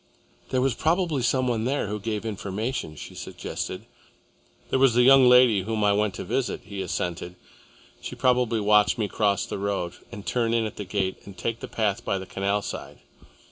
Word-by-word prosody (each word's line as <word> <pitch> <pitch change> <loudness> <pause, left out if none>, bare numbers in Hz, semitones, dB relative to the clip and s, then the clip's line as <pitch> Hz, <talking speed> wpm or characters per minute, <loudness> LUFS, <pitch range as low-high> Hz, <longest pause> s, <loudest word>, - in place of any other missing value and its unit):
"There 130 -1 +1
was 135 -1 +2
probably 160 - +1
some 130 +2 +1
one 115 -2 0
there 140 +3 0
who 105 +1 -3
gave 105 +1 -3
information," 105 - -3
she - - -9
suggested. 95 +4 -6 0.9
"There 130 - +2
was 130 -3 +4
the 125 - +5
young 135 0 +7
lady 125 -5 +6
whom 110 +2 -2
I 100 0 +4
went 105 -1 0
to - - -5
visit," 130 -3 -2
he 100 -2 -6
assented. 90 -1 -3 0.7
"She - - -6
probably 125 -3 +2
watched 105 -3 +4
me 110 -3 0
cross 100 0 +1
the - - -5
road 100 -4 -2
and 105 -4 -9
turn 115 -2 0
in 115 -1 +1
at 110 - -6
that 100 -3 -7
gate 95 -2 -1
and 100 -2 -11
take 115 0 -3
the - - -7
path 105 -3 -1
by 100 - -1
the 95 - -6
canal 100 +2 -1
side. - - -7
110 Hz, 195 wpm, -25 LUFS, 100-125 Hz, 0.9 s, young